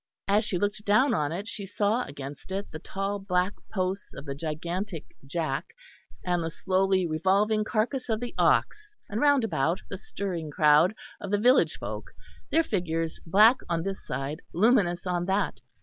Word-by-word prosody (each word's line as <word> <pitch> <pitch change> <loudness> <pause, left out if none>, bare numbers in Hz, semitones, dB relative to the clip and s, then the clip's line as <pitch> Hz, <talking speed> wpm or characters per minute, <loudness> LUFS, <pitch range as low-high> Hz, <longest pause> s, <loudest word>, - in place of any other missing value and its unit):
As 205 +2 +3
she 190 - -1
looked 205 +2 -1
down 220 +6 +4
on 150 -8 0
it 195 +6 -4
she 200 -3 -5
saw 210 +5 +1
against 140 +4 -9
it 195 +2 -4
the 155 - -7
tall 195 +4 -3
black 185 0 0 0.2
posts 190 0 -2
of 140 - -8
the 140 - -4
gigantic 165 +4 -4 0.2
jack 140 -2 -3 0.5
and 175 -2 +1
the 165 - -2
slowly 190 +2 +1
revolving 195 +6 +2
carcass 245 +4 -1
of 220 -1 +1
the 245 0 -5
ox; 420 0 +1
and 215 +3 -2
round 285 -3 +4
about 165 -3 0
the 195 - -5
stirring 180 -7 -4
crowd 155 +6 +4 0.2
of 200 - -6
the 205 - +2
village 245 +6 +4
folk, - - -6 0.4
their 330 - +3
figures 165 - -2
black 215 +9 +6
on 165 -1 0
this 195 +1 -4
side, 135 +5 -4
luminous 190 -4 +3
on 175 -1 -1
that. 195 +2 0
190 Hz, 170 wpm, -27 LUFS, 165-210 Hz, 0.5 s, black